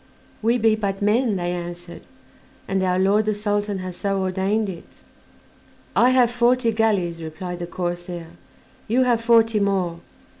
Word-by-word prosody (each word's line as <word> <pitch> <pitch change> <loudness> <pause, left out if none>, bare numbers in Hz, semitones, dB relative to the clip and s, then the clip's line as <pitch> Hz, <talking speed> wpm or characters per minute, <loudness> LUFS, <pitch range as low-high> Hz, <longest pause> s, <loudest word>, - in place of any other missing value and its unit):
"We 230 +3 +2
be 225 -1 +3
but 200 -3 -3
men," 220 +1 +2
they 175 -1 -2
answered, 175 0 -7 0.6
"and 190 0 0
our 180 -1 +1
lord 200 +3 +3
the 215 -1 0
Sultan 205 -1 -1
has 180 -1 -6
so 195 0 -1
ordained 190 +3 0
it." 175 -3 -10 0.9
"I 245 - +5
have 250 -2 +4
forty 245 0 +2
galleys," 200 -7 0
replied 175 +3 -6
the 175 - -5
corsair; 175 -1 -5 0.6
"you 245 +4 +3
have 240 -2 +2
forty 230 -1 +4
more. 190 -4 0
200 Hz, 150 wpm, -22 LUFS, 180-225 Hz, 0.9 s, I